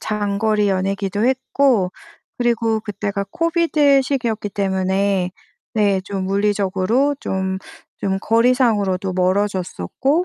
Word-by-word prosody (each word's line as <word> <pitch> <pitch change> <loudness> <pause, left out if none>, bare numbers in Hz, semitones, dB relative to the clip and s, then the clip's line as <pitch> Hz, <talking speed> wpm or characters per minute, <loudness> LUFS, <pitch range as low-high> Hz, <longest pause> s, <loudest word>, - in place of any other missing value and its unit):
장거리 210 0 0
연애기도 195 +2 -1
했고 260 -6 +2 0.4
그리고 230 -2 +1
그때가 205 -1 -3
코비드 320 - +3
시기였기 240 -6 -2
때문에 190 -1 0 0.4
네 200 -3 +2
좀 195 -1 -3
물리적으로 205 +6 +1
좀 190 0 -2 0.4
좀 190 -1 -1
거리상으로도 220 -5 +2
멀어졌었고 190 - 0
205 Hz, 265 characters per minute, -20 LUFS, 190-240 Hz, 0.4 s, 코비드